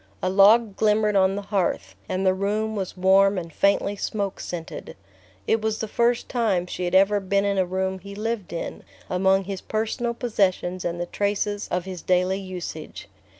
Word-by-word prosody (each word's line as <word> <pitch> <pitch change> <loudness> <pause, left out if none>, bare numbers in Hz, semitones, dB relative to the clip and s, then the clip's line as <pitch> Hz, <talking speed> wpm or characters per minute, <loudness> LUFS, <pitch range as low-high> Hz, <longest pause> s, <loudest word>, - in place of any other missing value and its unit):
A 185 - +1
log 205 +2 +5
glimmered 210 -1 +2
on 190 0 +3
the 205 - -4
hearth, 195 -3 -1 0.2
and 185 +1 -1
the 185 - +4
room 210 +3 -1
was 190 -2 -4
warm 195 +2 +4
and 170 -3 -5
faintly 200 +2 +2
smoke 200 -1 -3
scented. 170 -2 -7 0.5
It 225 - +1
was 220 0 -1
the 220 - -3
first 235 +2 +1
time 215 -8 0
she 180 0 -4
had 175 +1 -1
ever 195 +2 +5
been 200 +1 0
in 200 -1 +1
a 185 - +1
room 190 +1 -2
he 200 +2 -10
lived 215 -2 -3
in, 170 - -5 0.3
among 190 +1 +3
his 190 0 -5
personal 230 +2 -2
possessions 185 -6 0
and 175 0 -3
the 175 - -1
traces 205 +2 -1
of 180 0 -2
his 185 -3 -6
daily 185 +1 +1
usage. 180 -5 -7
195 Hz, 185 wpm, -24 LUFS, 185-210 Hz, 0.5 s, log